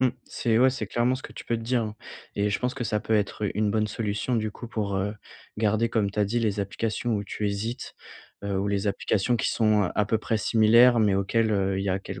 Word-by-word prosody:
Mmh. 130 - +4 0.2
C'est 115 -2 0
ouais 130 +1 +6
c'est 120 -5 -4
clairement 120 +4 +1
ce 130 - -7
que - - -9
tu - - -9
peux 115 - 0
te 115 - -7
dire, 120 0 +1
hein. 110 0 -5 0.4
Et 105 +1 0
je 100 - 0
pense 125 0 -2
que 125 -3 -3
ça 105 -2 0
peut 110 0 0
être, 105 0 0
heu, - - -2
une 105 0 +1
bonne 110 0 +1
solution 105 +3 -2
du 110 -1 -1
coup 120 +3 -9
pour, 100 -4 -2
heu, 100 +2 -1 0.4
garder 110 +1 +1
comme 105 -3 0
tu 105 - -8
as 105 - +4
dit 115 +5 -1
les 105 -2 0
applications 110 +3 -2
où 100 - -1
tu 105 +1 -3
hésites, 105 +4 -4 0.5
heu, 100 -1 -1
ou 100 - -1
les 100 0 -1
applications 100 +3 0
qui - - 0
sont 110 -2 +3
à 105 - +2
peu 110 +2 0
près 110 0 -1
similaires 115 +3 +5
mais 105 -3 +3
auxquelles, 110 +3 +1
heu, 95 -1 +1
il 100 - -2
y - - -1
a 95 +1 +1
quel - - -7
110 Hz, 265 wpm, -26 LUFS, 100-115 Hz, 0.5 s, ouais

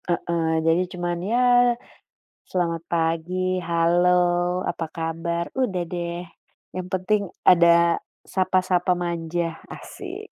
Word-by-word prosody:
Heeh, 170 -1 0
jadi 165 +2 +3
cuman 175 -1 -2
ya, 245 +2 +3 1.1
selamat 170 -2 -1
pagi, 175 +3 0
halo, 175 +2 +3 0.4
apa 165 - -3
kabar, 165 +1 -3
udah 210 -9 -1
deh 175 0 -4 0.5
yang 185 0 -5
penting 190 +2 0 0.2
ada 170 -1 +5 0.2
sapa-sapa 185 -1 +1
manja, 170 -1 -3
asyik. 405 +2 -9
175 Hz, 100 wpm, -23 LUFS, 170-185 Hz, 1.1 s, ada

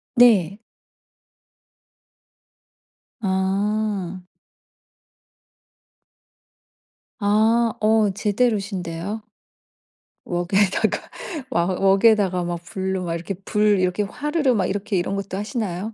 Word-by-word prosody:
네. 210 -6 +5 2.6
아. 195 0 -1 3.0
아. 220 +3 +3
어 215 -1 +3
제대로신데요. 205 -3 -1 1.0
웍에다가 185 +3 0 0.4
와 170 -9 +1
웍에다가 195 0 +3
막 175 -1 -4
불로 190 +2 -3
막 165 -1 -2
이렇게 170 +4 -4
불 210 -2 +2
이렇게 185 +3 +1
화르르 295 +4 0
막 195 -4 +1
이렇게 200 +1 -2
이런 180 +3 -1
것도 195 -1 -4
하시나요? 210 -2 -3
200 Hz, 170 characters per minute, -22 LUFS, 185-215 Hz, 3.0 s, 네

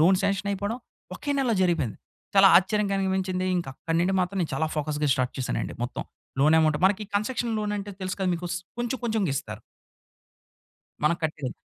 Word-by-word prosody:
Loan 185 +4 +6
సాంక్షనయిపోడం, 200 +3 -1 0.4
ఒకే 290 - -4
నెలలో 250 -4 +2
జరిగిపోయింది. 165 - 0 0.4
చాలా 195 0 +8
ఆశ్చర్యం 210 +3 +3
కలిగించింది. 190 -1 0
ఇంకక్కడి 165 +2 -3
నుండి 190 +2 +2
మాత్రం, 190 +2 -1
నేను 160 - -3
చాలా 160 +4 +1
ఫోకస్‌గా 150 0 0
స్టార్ట్ 130 -2 -1
చేసానండి 130 - -2
మొత్తం. 120 - -3 0.4
లోన్ 150 +3 +5
యమౌంటు 155 -2 +3
మనకి 205 +2 +1
కన్సక్షన్ 235 +2 -1
లోనంటే 205 -1 -3
తెలుసు 185 0 -3
కదా! 185 - +1
మీకు 175 +1 -4
స్ 175 - -1 0.2
కొంచెం 240 +1 -1
కొంచెంగిస్తారు. 155 - -1 1.4
మనం 170 +3 +4
కట్టేది. 150 -5 -2
185 Hz, 155 wpm, -26 LUFS, 155-205 Hz, 1.4 s, చాలా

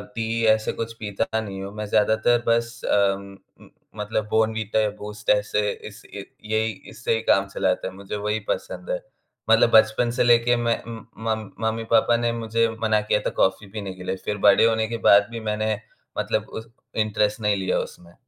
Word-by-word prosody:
T 115 0 -1
ऐसे 110 0 -1
कुछ 115 0 -4
पीता 110 +2 -2
नहीं 100 -3 -6
हूँ। 100 +1 -7
मैं 105 0 -4
ज़्यादातर 110 +3 +2
बस 115 0 0
अ, - - +2 0.2
उम 100 0 -11 0.2
उम, - - -17 0.3
मतलब 105 0 -2
बॉर्नविटा 110 -1 +1
या 105 - +1
बूस्ट 105 0 -6
ऐसे 105 0 +2 0.2
इस 105 0 -12
ए 100 -1 -7 0.3
यही 110 +1 +1 0.2
इससे 120 - -2
ही 115 - -2
काम 100 0 +3
चलाते 95 -2 -1
है। 95 - -7
मुझे 100 +2 -7
वही 105 +1 -1
पसंद - - -4
है, - - -1 0.5
मतलब 115 +1 +6
बचपन 110 +2 +4
से - - +5
लेके 120 0 +4
मैं 115 - +1
उम, 115 -1 -9 0.2
मम 110 -2 -2 0.2
मम्मी-पापा 115 +1 +2
ने 120 0 0
मुझे 115 0 0
मना 110 -1 +2
किया 105 0 +1
था - - +1
कॉफ़ी 100 +2 0
पीने 100 -3 -4
के 90 0 -11
लिए। 95 - -2
फिर 105 - -2
बड़े 100 +3 +6
होने 110 -1 +2
के 115 0 -3
बाद 100 0 +7
भी 115 - -5
मैंने 110 0 0 0.4
मतलब - - -1
उस 110 0 -8 0.4
इंटेरस्ट 105 +1 0
नहीं 105 -1 +2
लिया 95 -1 0
उसमें। 85 0 -8
110 Hz, 195 wpm, -24 LUFS, 105-115 Hz, 0.5 s, बाद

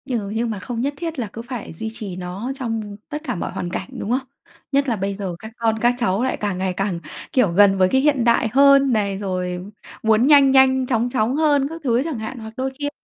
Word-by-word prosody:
Ừ, 225 -6 -2
như 225 +3 -1
mà 220 -4 -3
không 230 +4 -4
nhất 280 +3 -1
thiết 330 -4 -4
là 230 - -2
cứ 230 - -6
phải 240 -5 -7
duy 220 +7 -5
trì 210 -6 -6
nó 185 +7 -5
trong 225 -6 -4
tất 300 +1 -4
cả 250 -7 -3
mọi 170 - -4
hoàn 175 - -4
cảnh, - - -4
đúng 210 - -3
không? 260 +1 -1 0.4
Nhất 280 -1 +2
là 235 - +1
bây 195 0 -2
giờ 190 -3 -4
các 220 - -9
con 225 -1 +1
các 240 +1 +4
cháu 230 -2 +1
lại 260 - 0
càng 205 -3 -2
ngày 185 0 -1
càng, 195 -2 -2 0.3
kiểu, 250 -9 +3
gần 195 +2 +5
với 185 -1 +4
cái 265 - +3
hiện 285 -4 +2
đại 235 -1 +3
hơn 275 -1 +6
này, 200 -3 0
rồi 180 -2 -3 0.4
muốn 220 +3 +4
nhanh 280 -2 +7
nhanh 265 -1 +5
chóng 240 -1 +1
chóng 245 0 0
hơn 290 -3 +3
các 330 +1 -8
thứ 245 -2 +2
chẳng 305 -7 -4
hạn, 220 +3 -6
hoặc 220 0 -9
đôi 265 +1 -2
khi 290 0 -1
230 Hz, 250 wpm, -21 LUFS, 200-265 Hz, 0.4 s, nhanh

